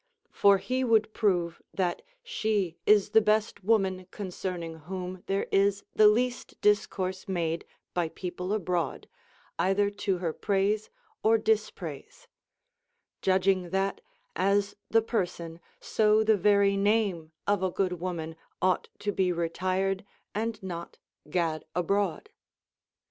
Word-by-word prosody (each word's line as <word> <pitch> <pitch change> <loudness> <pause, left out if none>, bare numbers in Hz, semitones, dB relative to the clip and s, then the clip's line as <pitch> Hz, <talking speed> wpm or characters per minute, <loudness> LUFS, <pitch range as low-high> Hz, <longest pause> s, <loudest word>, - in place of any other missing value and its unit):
For 200 -1 +5
he 255 +7 -1
wonld 220 -3 +3
prove 175 -6 0
that 180 -2 0 0.2
she 215 - -1
is 210 -1 +5
the 220 - +6
best 215 -1 +1
woman 190 -3 +1
concerning 180 -4 -5
whom 180 +3 -6
there 195 0 0
is 200 0 +3
the 215 - +7
least 245 +3 0
discourse 190 -2 +1
made 170 -3 -1 0.3
by 175 -2 0
people 180 +2 -5
abroad, 180 -7 -1 0.5
either 200 +2 +2
to 200 -2 -1
her 170 -3 -2
praise 205 +3 0 0.3
or 225 +1 +5
dispraise; 215 - -2 0.9
judging 185 -1 +2
that, 195 +2 -1 0.3
as 200 +1 +1
the 225 0 +4
person, 175 -7 -3 0.2
so 215 0 +3
the 220 0 +4
very 200 0 +4
name 200 -5 +1
of 205 -2 +2
a 190 - +1
good 185 +1 0
Avoman 170 -2 -4 0.2
ought 185 -1 +1
to 205 - 0
be 190 -2 +1
retired 185 +3 -1 0.3
and 220 0 -3
not 170 -2 -6 0.3
gad 160 -1 0
abroad. 200 - 0
195 Hz, 125 wpm, -28 LUFS, 180-210 Hz, 0.9 s, the